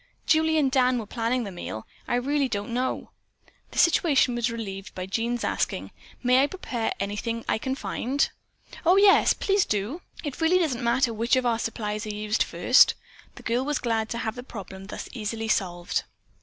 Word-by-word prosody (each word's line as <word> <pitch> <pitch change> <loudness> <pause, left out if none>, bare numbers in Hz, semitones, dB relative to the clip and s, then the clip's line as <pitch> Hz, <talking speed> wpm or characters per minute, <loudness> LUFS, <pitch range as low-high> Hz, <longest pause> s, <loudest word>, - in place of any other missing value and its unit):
"Julie 320 0 +3
and 275 -4 +2
Dan 255 -1 +3
were 225 - -3
planning 235 +3 -1
the 200 - -6
meal. 110 -11 -6 0.2
I - - +1
really 275 +2 +1
don't 205 0 -3
know." 255 +2 -2 0.6
The - - -11
situation 315 -7 +4
was 240 0 0
relieved 210 -3 -6
by 185 - -4
Jean's 235 +5 -1
asking: - - -1 0.3
"May 250 +1 +5
I 280 - +3
prepare 255 -10 -3
anything 210 +3 -3
I - - +1
can 260 +3 -2
find?" 275 +1 -1 0.6
"Oh, 350 +2 +5
yes, 395 0 +6
do - - -27
please! 395 -1 +2 0.6
It 295 +1 -5
really 330 +3 +4
doesn't 275 -9 0
matter 235 0 +2
which 230 +3 +2
of 255 -1 +1
our 230 -2 +2
supplies 215 -2 -3
are 210 - -4
used 210 +2 -1
first." - - +5 0.4
The - - -12
girl 240 +2 0
was 295 0 0
glad 225 -2 -1
to 235 - -3
have 220 -1 -2
the 245 - -7
problem 195 -5 -9
thus - - -6
easily 225 -1 -3
solved. 175 -5 0
235 Hz, 185 wpm, -26 LUFS, 220-265 Hz, 0.6 s, yes